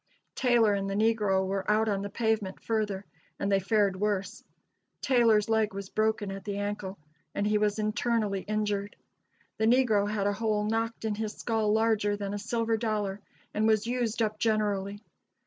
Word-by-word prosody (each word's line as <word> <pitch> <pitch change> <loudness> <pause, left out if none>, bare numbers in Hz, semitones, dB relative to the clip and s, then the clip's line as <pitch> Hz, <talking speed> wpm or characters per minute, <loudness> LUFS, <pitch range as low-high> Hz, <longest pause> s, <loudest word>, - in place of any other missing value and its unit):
Taylor 240 -5 +3
and 195 0 -1
the 195 - -2
negro 210 -3 +2
were 195 +1 -2
out 215 +1 +3
on 200 -2 0
the 200 - -4
pavement 220 -3 -1
further, 210 -3 -2 0.3
and 200 - -1
they 195 - +4
fared 200 0 +2
worse. 205 0 -1 0.6
Taylor's 230 -5 +3
leg 220 -3 +1
was 200 -1 -6
broken 215 -2 0
at 195 0 -7
the 205 -2 -4
ankle, 205 -1 -4 0.4
and 200 - 0
he 210 0 +2
was 210 0 +1
internally 215 -2 0
injured. 210 -1 -2 0.6
The 220 - +3
negro 225 -5 +3
had 210 -2 -1
a 205 - +2
hole 210 0 0
knocked 225 +1 -2
in 220 - 0
his 215 0 -3
skull 220 -2 0
larger 220 -2 +2
than 200 -1 -4
a 205 - -3
silver 225 +1 0
dollar, 210 -3 -2 0.3
and 215 +1 +1
was 215 -1 +3
used 235 -2 0
up 215 -1 -2
generally. 205 -2 0
210 Hz, 175 wpm, -29 LUFS, 200-220 Hz, 0.6 s, they